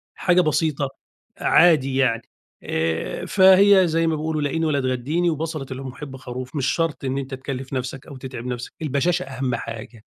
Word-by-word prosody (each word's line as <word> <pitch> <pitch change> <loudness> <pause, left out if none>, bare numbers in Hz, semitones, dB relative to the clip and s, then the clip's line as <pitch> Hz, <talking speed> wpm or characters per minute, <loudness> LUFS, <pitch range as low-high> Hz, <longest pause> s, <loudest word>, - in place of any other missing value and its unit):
حاجة 180 0 +3
بسيطة، 155 -3 0 0.5
عادي 150 -6 +4
يعني 125 -4 +2 0.4
آآ، 80 -6 -2
فهي 190 -1 +6
زي 165 +1 +1
ما 160 - +1
بيقولوا 155 0 -2
"لاقيني 155 +3 0
ولا 150 -3 +1
تغدّيني"، 135 +7 0
و"بَصَلة 155 -2 -3
المُحِبّ 130 +1 -7
خروف"، 130 +1 -7
مش 140 -4 0
شرط 165 -3 -1
إن 130 +1 -1
أنت 135 0 -5
تِكَلّف 135 0 -6
نَفسَك 130 0 -4
أو 140 - -9
تتعب 130 -2 -7
نَفسَك، 125 -1 -5
البشَاشَة 160 +5 +1
أهم 130 -2 -2
حاجة، 115 -1 -8
135 Hz, 160 wpm, -23 LUFS, 130-160 Hz, 0.5 s, فهي